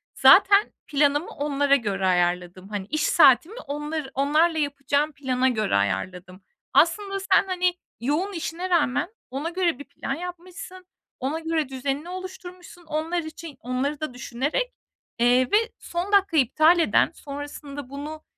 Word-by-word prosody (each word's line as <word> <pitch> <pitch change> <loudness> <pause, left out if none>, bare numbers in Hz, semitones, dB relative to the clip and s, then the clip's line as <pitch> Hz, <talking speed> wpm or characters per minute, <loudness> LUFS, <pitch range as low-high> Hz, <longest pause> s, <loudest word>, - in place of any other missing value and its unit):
"Zaten 405 +1 +6 0.2
planımı 290 +2 +1
onlara 285 -1 +1
göre 200 -7 -1
ayarladım." 180 +1 0
Hani, 205 -2 -5
iş 310 -1 -1
saatimi, 325 - +4
onları 295 -1 -4
onlarla 305 +5 +2
yapacağım 285 +1 0
plana 260 -2 0
göre 215 - 0
ayarladım. 180 - -2 0.3
Aslında 390 +4 +2
sen, 385 0 +3
hani, 360 -1 +1 0.3
yoğun 310 +11 -1
işine 345 +1 -4
rağmen 335 -1 +1 0.2
ona 285 +6 -3
göre 345 -6 0
bir - - -7
plan 270 - -5
yapmışsın, 360 +2 -8 0.3
ona 275 +5 -2
göre 320 -3 -1
düzenini 275 +5 -3
oluşturmuşsun 365 -1 -9
onlar 315 +3 -2
için, 315 -2 -9
onları 255 +4 -2
da 310 -5 -4
düşünerek. 280 - -2 0.5
Eee, 245 +2 +4
ve 415 - +6 0.2
son 350 +4 -4
dakika 395 -5 +3
iptal 310 +6 +4
eden, 330 - +3
sonrasında 285 -1 -8
bunu, 300 +3 -7
295 Hz, 135 wpm, -24 LUFS, 260-345 Hz, 0.5 s, Zaten